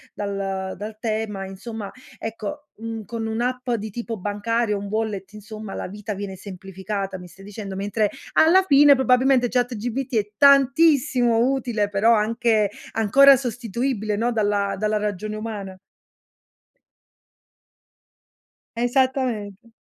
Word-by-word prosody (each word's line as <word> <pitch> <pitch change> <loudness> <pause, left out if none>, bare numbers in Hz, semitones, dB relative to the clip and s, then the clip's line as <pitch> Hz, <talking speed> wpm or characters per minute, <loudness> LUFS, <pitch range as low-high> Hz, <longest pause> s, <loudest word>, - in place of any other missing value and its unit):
dal 195 +1 -4
tema, 215 -3 -2
insomma, 205 +2 -7 0.3
ecco, 225 +6 -6
mhmm, 225 -1 -6
con 225 +2 -5
un'app 250 +3 -2
di 220 -2 -2
tipo 230 +1 -5
bancario, 210 +2 -1
un 200 - -6
wallet 210 -2 -3
insomma, 215 -1 -8
la - - -4
vita 210 +1 -6
viene 195 -1 -6
semplificata, 195 0 -6
mi 180 - -11
stai 195 +3 -16
dicendo. 200 -1 -7
Mentre, 205 +1 0 0.2
alla 360 +4 +5
fine, 285 -3 +7
probabilmente 255 -1 +3
ChatGPT 245 +1 -2
è 210 -1 +1
tantissimo 275 -4 +4
utile, 230 -6 -1
però 210 +4 +3
anche 220 -1 +1 0.2
ancora 270 +6 +6
sostituibile, 235 -2 -2
no, 235 +3 0
dalla 205 -2 0
dalla 215 +1 0
ragione 210 0 -3
umana? 205 -4 -6 3.0
Esattamente. 240 -4 -1
220 Hz, 115 wpm, -23 LUFS, 205-245 Hz, 3.0 s, fine